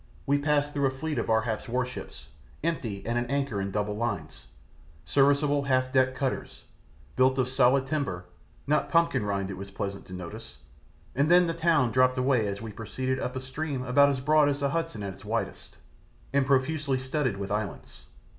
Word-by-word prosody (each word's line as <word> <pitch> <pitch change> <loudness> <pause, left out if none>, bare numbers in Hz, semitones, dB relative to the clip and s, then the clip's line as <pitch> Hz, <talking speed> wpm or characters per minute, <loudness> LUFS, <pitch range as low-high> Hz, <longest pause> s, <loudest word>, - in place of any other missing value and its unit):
We 140 +1 +2
passed 145 0 +1
through 140 -1 +2
a - - +2
fleet 135 +1 -3
of - - -3
Ar 110 0 +3
hap's 110 +2 -3
warships, 125 +1 -4 0.4
empty 120 -12 -2
and 120 +1 0
at 120 0 -3
anchor 140 -7 -1
in 95 - -2
double 105 +1 -2
line, 100 -8 -2 0.8
serviceable 140 +1 +3
half 130 -1 +1
decked 130 -1 +3
cutters, 135 -1 -3 0.5
built 130 +1 +3
of 130 -2 +2
solid 130 +1 +3
timber, 135 - -2 0.4
not 150 +2 +1
pumpkin 165 -8 +3
rind 100 -1 -2
it 95 - -6
was 100 +1 -7
pleasant 100 0 -5
to 95 - -10
notice, 90 -2 -8 0.6
and 140 +4 +2
then 180 +1 +6
the 165 - -1
town 165 -7 +2
dropped 130 +1 +3
away 125 -4 +2
as 100 +2 -4
we 110 - -6
proceeded 130 +5 -3
up 125 0 -3
a - - -2
stream 135 +1 -4
about 140 +3 +5
as 140 -2 -1
broad 150 +2 +4
as 140 0 -2
the 140 -1 +1
Hudson 165 -9 -2
at 100 -1 -4
its - - -16
widest, - - -4 0.6
and 140 -2 +2
profusely 140 +1 +1
studded 130 -4 -1
with 100 0 -5
islands. 105 -3 -4
130 Hz, 190 wpm, -28 LUFS, 110-140 Hz, 0.8 s, then